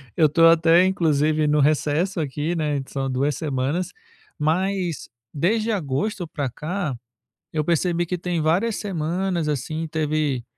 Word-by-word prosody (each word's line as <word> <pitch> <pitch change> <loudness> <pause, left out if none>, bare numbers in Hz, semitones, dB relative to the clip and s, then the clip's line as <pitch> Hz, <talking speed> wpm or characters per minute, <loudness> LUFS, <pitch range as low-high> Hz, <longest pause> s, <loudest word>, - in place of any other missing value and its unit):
eu 155 -2 +4
tô 165 +3 +4
até 165 +2 +5
inclusive 155 -4 +2
no 150 0 +3
recesso 155 +5 +1
aqui, 150 +2 -2
né, 150 -3 0
são 135 0 -3
duas 140 +3 0
semanas, 145 +3 -2 0.5
mas 175 +2 -1 0.2
desde 215 +9 +1
agosto 175 +2 -2
pra 145 -6 -3
cá, 160 -2 -3 0.6
eu 155 -1 -1
percebi 175 +1 +1
que 180 +1 -3
tem 175 -2 -2
várias 195 +8 +1
semanas 175 -2 -2
assim, 155 +3 -2
teve 150 -5 -1
160 Hz, 135 wpm, -23 LUFS, 150-180 Hz, 0.6 s, até